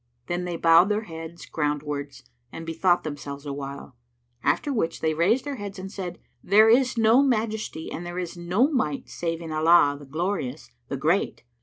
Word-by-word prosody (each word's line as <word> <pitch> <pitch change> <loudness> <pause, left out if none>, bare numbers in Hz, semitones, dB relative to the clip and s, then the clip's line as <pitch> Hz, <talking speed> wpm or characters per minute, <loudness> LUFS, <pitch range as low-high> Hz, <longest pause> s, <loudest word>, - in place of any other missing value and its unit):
Then 175 +4 -2
they 175 -1 -3
bowed 165 +4 +6
their 210 +1 0
heads 165 -2 -9
groundwards 145 -2 -3 0.3
and 165 - -7
bethought 175 +2 +2
themselves 145 -1 -6
awhile; 140 -2 -6 0.5
after 210 - +1
which 215 -9 -1
they 160 -1 +1
raised 190 - +2
their 285 -2 -4
heads 200 -2 -7
and 190 +1 -7
said, 180 -4 -6 0.3
"There 215 +4 +6
is 250 +1 +4
no 225 +3 +5
Majesty 220 - -1
and 170 - -5
there 175 +1 -6
is 180 -1 -4
no 180 +9 +2
Might 250 - -1
save 165 -1 -3
in 165 -1 -6
Allah, 155 -2 +5
the 145 - -12
Glorious, 155 -5 -3 0.2
the 140 - -3
Great!" 160 +4 0
170 Hz, 175 wpm, -25 LUFS, 150-205 Hz, 0.5 s, bowed